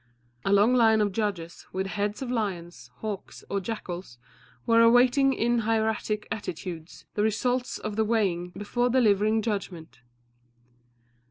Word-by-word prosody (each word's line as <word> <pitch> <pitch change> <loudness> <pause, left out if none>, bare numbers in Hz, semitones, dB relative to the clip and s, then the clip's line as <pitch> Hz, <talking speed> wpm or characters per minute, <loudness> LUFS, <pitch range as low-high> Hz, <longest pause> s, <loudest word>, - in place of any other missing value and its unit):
A 195 - 0
long 205 +5 +5
line 225 -3 +5
of 205 -1 +1
judges, 190 -5 -4
with 190 +1 -2
heads 205 +4 -2
of 250 - -4
lions, 175 - -4
hawks, 210 -3 -6
or 200 - +1
jackals, 180 - -6 0.5
were 230 0 +5
awaiting 245 +4 +5
in 240 -1 +1
hieratic 220 -1 -1
attitudes 175 -4 -6
the 210 - -1
result 245 +4 0
of 215 -1 -4
the 220 - +3
weighing 195 -6 0
before 240 +4 0
delivering 215 -3 +3
judgment. 190 - -4
210 Hz, 135 wpm, -27 LUFS, 195-230 Hz, 0.5 s, long